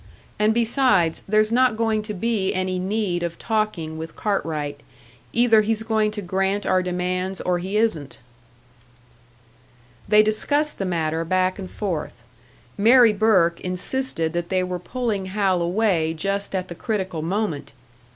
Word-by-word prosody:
And 210 Hz, +1 st, +3 dB
besides, 225 Hz, -, +2 dB
there's 215 Hz, +1 st, +3 dB
not 250 Hz, -1 st, +3 dB
going 220 Hz, -1 st, +1 dB
to 210 Hz, 0 st, -5 dB
be 200 Hz, -1 st, -1 dB
any 185 Hz, 0 st, -1 dB
need 190 Hz, -2 st, -1 dB
of 170 Hz, -1 st, -4 dB
talking 200 Hz, -8 st, -2 dB
with 160 Hz, +1 st, -7 dB
Cartwright. 150 Hz, -8 st, -2 dB, 0.5 s
Either 230 Hz, -2 st, +5 dB
he's 220 Hz, +1 st, 0 dB
going 220 Hz, -1 st, +1 dB
to 210 Hz, -1 st, -5 dB
grant 195 Hz, +2 st, -1 dB
our 185 Hz, 0 st, +2 dB
demands 180 Hz, +1 st, -2 dB
or 180 Hz, -1 st, 0 dB
he 190 Hz, +4 st, -2 dB
isn't." 190 Hz, -11 st, 0 dB, 1.9 s
They 210 Hz, 0 st, +6 dB
discussed 290 Hz, +8 st, +1 dB
the 195 Hz, -, -1 dB
matter 165 Hz, -2 st, -1 dB
back 185 Hz, +2 st, 0 dB
and 185 Hz, -2 st, -6 dB
forth. 165 Hz, -, -4 dB, 0.6 s
Mary 230 Hz, +1 st, +6 dB
Burke 195 Hz, -6 st, +2 dB
insisted 180 Hz, -2 st, -2 dB
that 175 Hz, 0 st, -3 dB
they 185 Hz, -1 st, +1 dB
were 180 Hz, -1 st, -3 dB
pulling 215 Hz, -1 st, -3 dB
Hal 190 Hz, -2 st, +1 dB
away 170 Hz, -3 st, +1 dB
just 195 Hz, +4 st, -2 dB
at 185 Hz, -1 st, -2 dB
the 175 Hz, -, -7 dB
critical 185 Hz, -3 st, -3 dB
moment! 165 Hz, -5 st, -3 dB
190 Hz, 145 wpm, -23 LUFS, 175-215 Hz, 1.9 s, They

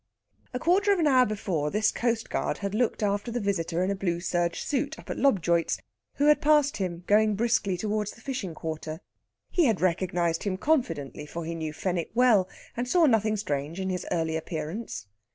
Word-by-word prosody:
A 250 Hz, -, -2 dB
quarter 380 Hz, +8 st, +3 dB
of 400 Hz, -, +3 dB
an 330 Hz, -, +2 dB
hour 255 Hz, -3 st, +5 dB
before, 185 Hz, -8 st, -1 dB
this 215 Hz, +5 st, +2 dB
coastguard 230 Hz, -1 st, -1 dB
had 200 Hz, -1 st, -4 dB
looked 225 Hz, -1 st, 0 dB
after 205 Hz, +3 st, 0 dB
the 240 Hz, +1 st, -2 dB
visitor 180 Hz, -4 st, -1 dB
in 190 Hz, -, 0 dB
a -, -, 0 dB
blue 175 Hz, -3 st, -1 dB
serge 175 Hz, -1 st, -1 dB
suit 290 Hz, +2 st, -1 dB
up -, -, -8 dB
at -, -, -4 dB
Lobjoit's, 175 Hz, -10 st, +2 dB, 0.4 s
who 285 Hz, -, +1 dB
had 300 Hz, 0 st, +5 dB
passed 295 Hz, -1 st, +4 dB
him 180 Hz, -3 st, -3 dB
going 215 Hz, +1 st, +4 dB
briskly 210 Hz, -4 st, +1 dB
towards 210 Hz, +2 st, -1 dB
the 225 Hz, -, -11 dB
fishing 225 Hz, -, -4 dB
quarter. 155 Hz, +1 st, -5 dB, 0.5 s
He 350 Hz, -3 st, +3 dB
had 225 Hz, -7 st, +2 dB
recognised 175 Hz, -2 st, 0 dB
him 195 Hz, -2 st, -2 dB
confidently, 165 Hz, -, -1 dB
for 165 Hz, +2 st, -5 dB
he 165 Hz, -, -3 dB
knew 160 Hz, -2 st, -4 dB
Fenwick 175 Hz, +2 st, -2 dB
well, 225 Hz, -7 st, +4 dB, 0.3 s
and 245 Hz, +1 st, -2 dB
saw 345 Hz, +5 st, +4 dB
nothing 220 Hz, -5 st, +3 dB
strange 150 Hz, -3 st, -3 dB
in 190 Hz, 0 st, -1 dB
his 180 Hz, -, -4 dB
early 160 Hz, -1 st, 0 dB
appearance. 160 Hz, -, -4 dB
200 Hz, 190 wpm, -27 LUFS, 170-240 Hz, 0.5 s, hour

